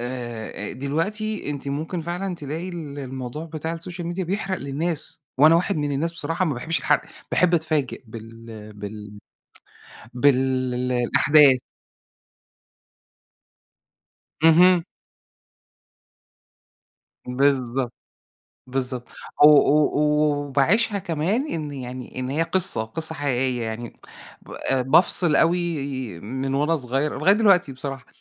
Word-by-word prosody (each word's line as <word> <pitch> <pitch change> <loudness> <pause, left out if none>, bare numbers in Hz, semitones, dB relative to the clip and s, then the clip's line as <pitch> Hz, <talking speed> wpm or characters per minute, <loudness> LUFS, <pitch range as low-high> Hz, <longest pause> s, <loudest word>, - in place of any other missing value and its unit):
آآ 120 -4 -6
أ - - -7
دلوقتي 190 +9 -2
أنتِ 140 -1 -5
ممكن 155 +5 -3
فعلًا 175 +3 -4
تلاقي 160 +3 -5
ال 155 -5 -7
الموضوع 130 +2 -6
بتاع 160 0 -5
السوشيال 170 +1 -6
ميديا 175 +2 -3
بيحرق 195 +1 -2
للناس، 155 +2 -3
وأنا 155 +4 +7
واحد 180 +3 +1
من 145 -1 -1
الناس 160 +5 -1
بصراحة 165 +2 -2
ما 155 -5 -1
باحبش 160 +7 -2
الحرق، - - +2 0.3
باحب 180 -1 +3
أتفاجئ 155 -5 -1
بال 115 -1 -11
بال 105 0 -9 1.0
بال 135 +2 +4 0.6
الأحداث. 135 +3 +5 2.9
اهم. 170 +2 +6 2.4
بالضبط، 130 -1 0 0.7
بالضبط. 125 -1 -3 0.3
أو 150 - +10
أو 150 0 +4
و 150 -1 +1
وباعيشها 200 - +2
كمان 190 - -1
إن 150 -3 -4
يعني 125 -1 -7
إن 130 - -3
هي 150 +4 0
قصة، 170 -8 +1
قصة 160 +8 -3
حقيقية 130 -4 -1
يعني. 115 +1 -5 0.5
ب - - -16 0.2
أ 135 -1 +2
بافصل 160 +3 +4
أوي، 170 -1 +2 0.4
من 130 +6 -4
وأنا 150 +4 +2
صغير، 135 +2 -2
لغاية 185 +6 +5
دلوقتي 195 -8 +3
بصراحة، 135 0 -7
145 Hz, 115 wpm, -23 LUFS, 130-170 Hz, 2.9 s, أو